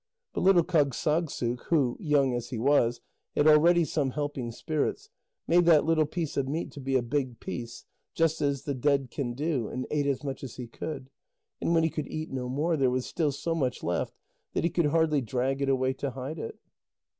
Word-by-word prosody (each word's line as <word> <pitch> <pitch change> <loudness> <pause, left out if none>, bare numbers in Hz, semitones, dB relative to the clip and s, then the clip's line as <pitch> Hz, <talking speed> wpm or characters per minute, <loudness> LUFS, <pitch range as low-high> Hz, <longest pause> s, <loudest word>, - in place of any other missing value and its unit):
But - - -2
little 185 -3 +5
Kâgssagssuk, 150 -5 0
who, 140 -8 +2
young 140 -4 +2
as 120 0 -3
he 125 - -4
was, 120 -1 +2 0.3
had 145 - +3
already 165 +3 +6
some 145 -3 0
helping 145 -3 -3
spirits, 160 - -2 0.3
made 175 +1 +4
that 160 -3 +6
little 160 -2 +3
piece 165 -1 -3
of 135 -1 +1
meat 160 +4 -3
to - - -10
be 135 0 -1
a 130 - +3
big 125 -1 -2
piece, 120 -1 -6 0.3
just 165 -1 +1
as 140 -2 0
the 145 - -2
dead 140 -1 +1
can 125 -5 -3
do, 140 -5 -1
and 130 - -4
ate 145 -1 +1
as 140 0 -1
much 135 -2 -5
as 130 - -7
he 125 - -6
could, 130 +3 -7 0.5
and 170 - +2
when 165 - +4
he 160 - +3
could 150 - -4
eat 155 0 -5
no 125 -2 -3
more, 155 +6 +1
there 135 -2 +3
was 125 0 -1
still 155 -4 0
so 165 +4 -2
much 130 -6 -1
left 85 +1 -1 0.4
that - - 0
he 170 - +1
could 170 -4 +2
hardly 155 -1 +2
drag 130 +3 -1
it 140 - +1
away 130 0 +2
to 140 +1 -3
hide 135 +5 -6
it. 115 - -6
140 Hz, 210 wpm, -28 LUFS, 130-160 Hz, 0.5 s, already